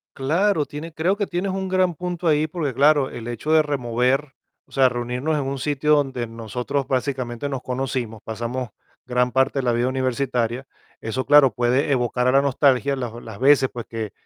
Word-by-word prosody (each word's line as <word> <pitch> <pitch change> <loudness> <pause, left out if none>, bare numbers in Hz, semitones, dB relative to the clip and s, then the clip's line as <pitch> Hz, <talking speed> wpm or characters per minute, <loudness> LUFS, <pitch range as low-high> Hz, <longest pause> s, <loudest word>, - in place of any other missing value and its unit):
Claro, 160 +4 +1
tiene 150 +4 -8
creo 170 +5 +1
que 205 0 -1
tienes 185 +1 -2
un 190 0 -3
gran 185 -2 +2
punto 175 +1 -4
ahí, 155 -1 +3
porque 155 -4 -3
claro, 145 +1 +4
el 120 0 -7
hecho 120 +6 -3
de 160 - +6
remover, 135 0 0 0.3
o - - -30
sea, 130 -2 +4
reunirnos 125 +5 -2
en 145 - -1
un 135 +1 -3
sitio 150 +2 +1
donde 135 -5 -1
nosotros 120 +5 -3
básicamente 130 -1 -2
nos 135 -3 -4
conocimos, 125 -4 -3
pasamos 120 +2 -4 0.3
gran 125 0 +1
parte 135 +2 +1
de - - -2
la 125 - +2
vida 120 +1 +1
universitaria, 130 -1 -1 0.3
eso 125 +4 -3
claro, 145 -4 +6
puede 125 +5 +1
evocar 125 0 0
a 130 - +3
la 135 - +5
nostalgia 140 0 +2
las 120 -4 -4
las 110 -3 -9
veces, 135 0 +5
pues 120 -2 -6
que 110 -3 -5
130 Hz, 190 wpm, -22 LUFS, 125-150 Hz, 0.3 s, de